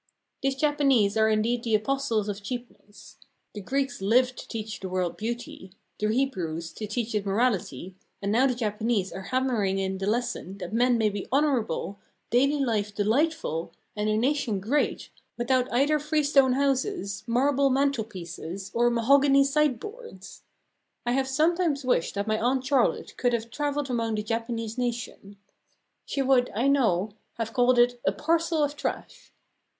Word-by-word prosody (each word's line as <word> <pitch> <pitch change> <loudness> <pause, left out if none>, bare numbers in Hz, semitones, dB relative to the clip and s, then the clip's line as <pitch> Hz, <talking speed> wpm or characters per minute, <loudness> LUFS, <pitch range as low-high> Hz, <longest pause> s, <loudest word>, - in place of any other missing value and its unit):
These 270 -1 0
Japanese 275 -8 +2
are 220 0 +3
indeed 225 +3 +1
the 225 -2 +2
apostles 225 -2 0
of 205 0 -4
cheapness. 240 -2 -9 0.4
The 210 - -6
Greeks 270 +2 -2
lived 250 +5 +3
to - - -9
teach 220 -2 -5
the 190 - -6
world 180 -2 -1
beauty, 220 -4 -6 0.3
the 210 - +1
Hebrews 180 -10 -2
to 215 - -6
teach 230 +1 -3
it 210 -2 0
morality, 195 - -1 0.3
and 200 0 -2
now 250 +5 +4
the 250 - 0
Japanese 215 -3 -1
are 190 - -6
hammering 245 -7 +1
in 190 0 -2
the 195 - -3
lesson 225 -4 -2
that 185 0 -7
men 245 +1 +3
may 220 -2 +2
be 200 -1 -5
honourable, 250 - 0 0.3
daily 275 +5 +3
life 210 -3 -1
delightful, 215 - 0 0.2
and 210 0 -1
a 215 - +1
nation 245 -4 0
great 250 +10 -1 0.3
without 250 +1 +1
either 285 +5 +2
freestone 290 -3 +3
houses, 270 - -1
marble 275 +3 +2
mantelpieces, 200 - -2
or 240 +1 +3
mahogany 275 +4 +4
sideboards. 300 - -2 0.6
I 240 - +1
have 265 +1 +1
sometimes 310 0 +1
wished 245 -9 +1
that 200 0 -1
my 215 0 0
Aunt 255 +2 0
Charlotte 265 -2 +1
could 245 -1 +1
have 230 0 -2
travelled 290 -1 -2
among 230 -2 -1
the 210 - -2
Japanese 230 +1 -3
nation. 235 -4 -4 0.7
She 275 - -1
would, 255 -2 +3
I 240 +5 +1
know, 215 -8 +2 0.2
have 225 -1 -4
called 250 -1 +3
it 245 0 +3
a - - +2
"parcel 325 - +1
of 290 0 -1
trash." - - -5
240 Hz, 155 wpm, -26 LUFS, 210-275 Hz, 0.7 s, now